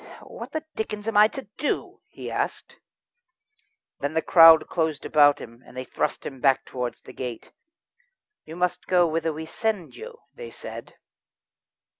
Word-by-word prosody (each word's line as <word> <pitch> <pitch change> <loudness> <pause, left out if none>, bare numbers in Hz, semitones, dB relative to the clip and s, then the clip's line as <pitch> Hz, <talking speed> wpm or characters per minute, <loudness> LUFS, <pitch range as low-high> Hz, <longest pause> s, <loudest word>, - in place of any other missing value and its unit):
"What - - -9
the 315 0 -4
dickens 210 -1 -5
am 225 - -2
I 210 +1 +8
to 270 +4 -8 0.2
do?" 295 - -2
he - - -8
asked. - - -3 1.2
Then 145 +2 -3
the 160 - +1
crowd 165 -2 +8
closed 160 -3 -2
about 145 -1 +5
him, 115 +1 -12
and - - -15
thrust - - -2
him 135 -2 -7
back 135 -2 +3
towards 125 -1 -5
the - - -12
gate. 125 -3 -7 0.9
"You 160 - -10
must 180 0 -1
go 180 -1 +4
whither 165 0 -1
we 160 +1 -6
send 205 0 -3
you," 470 +1 -10 0.2
they 475 -1 -9
said. - - -9
165 Hz, 155 wpm, -25 LUFS, 145-210 Hz, 1.2 s, I